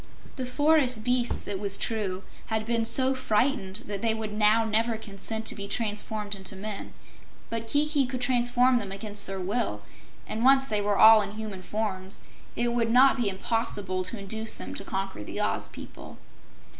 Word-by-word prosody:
The 255 -2 -4
forest 270 -4 +2
beasts, 245 0 0
it 200 -2 -2
was 200 -1 +1
true, 195 -4 -2 0.2
had 220 -1 -1
been 230 0 0
so 260 +3 +5
frightened 220 -4 0
that 200 -1 -4
they 225 -1 +2
would 215 -1 -5
now 215 +1 +4
never 225 +1 +1
consent 220 +1 -5
to - - +3
be 200 -1 -6
transformed 210 -1 -3
into 195 0 -6
men, 205 +1 -6 0.6
but 230 0 -3
Kiki 290 +1 +2
could 255 0 -4
transform 245 0 +3
them 200 -3 -6
against 205 +1 -2
their 195 0 -4
will, 190 - -2 0.4
and 220 +2 -4
once 270 +1 +5
they 210 -3 +1
were 205 0 0
all 220 0 +8
in 205 - -5
human 215 -3 -6
forms, 195 -2 -4 0.3
it 240 0 0
would 230 -1 +1
not 255 +3 +6
be 240 -6 0
impossible 195 -2 -1
to 230 - -3
induce 220 +3 -1
them 90 0 -6
to - - -6
conquer 195 - -4
the - - -6
Oz - - -1
people. - - -11
220 Hz, 180 wpm, -27 LUFS, 200-240 Hz, 0.6 s, all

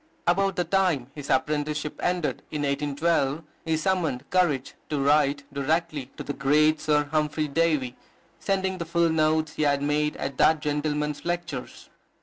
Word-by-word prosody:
About 195 +2 +2
the 180 - +1
time 170 -8 +1
his 145 -2 -8
apprenticeship 150 +2 -1
ended, 175 -3 -1
in 150 -1 -3
1812, 145 +1 0 0.2
he 160 -1 +1
summoned 160 -6 -1
courage 155 -8 +1 0.2
to 150 - -1
write 145 0 +3
directly 150 -1 -1
to - - -5
the 145 - -4
great 150 +3 +3
Sir 150 -1 +2
Humphry 155 0 0
Davy, 145 -4 +1 0.4
sending 190 -1 -1
the 170 - -3
full 170 0 +2
notes 155 -1 +1
he - - -4
had 140 -1 +2
made 150 +1 0
at 135 -1 -5
that 160 -1 +5
gentleman's 150 0 -2
lectures. 170 -6 -4
150 Hz, 150 wpm, -26 LUFS, 145-165 Hz, 0.4 s, that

